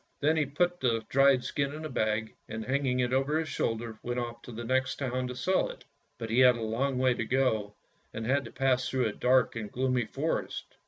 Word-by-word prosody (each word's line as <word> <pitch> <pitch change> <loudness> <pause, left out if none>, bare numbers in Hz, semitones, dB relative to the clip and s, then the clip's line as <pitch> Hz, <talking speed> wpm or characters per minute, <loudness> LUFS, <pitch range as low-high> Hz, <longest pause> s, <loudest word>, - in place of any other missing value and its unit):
Then 155 +2 +3
he 150 -3 +1
put 175 +5 0
the 115 -3 0
dried 135 -1 +4
skin 140 0 -2
into 155 0 -5
a - - -10
bag, 110 0 -1 0.2
and 110 0 -5
hanging 130 -1 +1
it 125 0 0
over 135 +4 +2
his 160 -1 -2
shoulder 115 -1 -2
went 120 0 -3
off 120 -1 -5
to 125 - -10
the 115 +1 -6
next 130 +2 0
town 130 -2 -2
to 125 - -6
sell 185 +8 +1
it. - - -11 0.3
But 115 -1 -5
he 120 - +3
had 125 -1 +7
a - - -6
long 125 +5 -1
way 130 0 +3
to 120 - -2
go, 110 -4 0 0.4
and 110 +1 -5
had 135 +3 +2
to - - -9
pass 130 -2 +1
through 130 -2 +1
a 110 - 0
dark 130 +2 +2
and 110 -3 -5
gloomy 125 -1 0
forest. - - -3
125 Hz, 230 wpm, -29 LUFS, 115-135 Hz, 0.4 s, had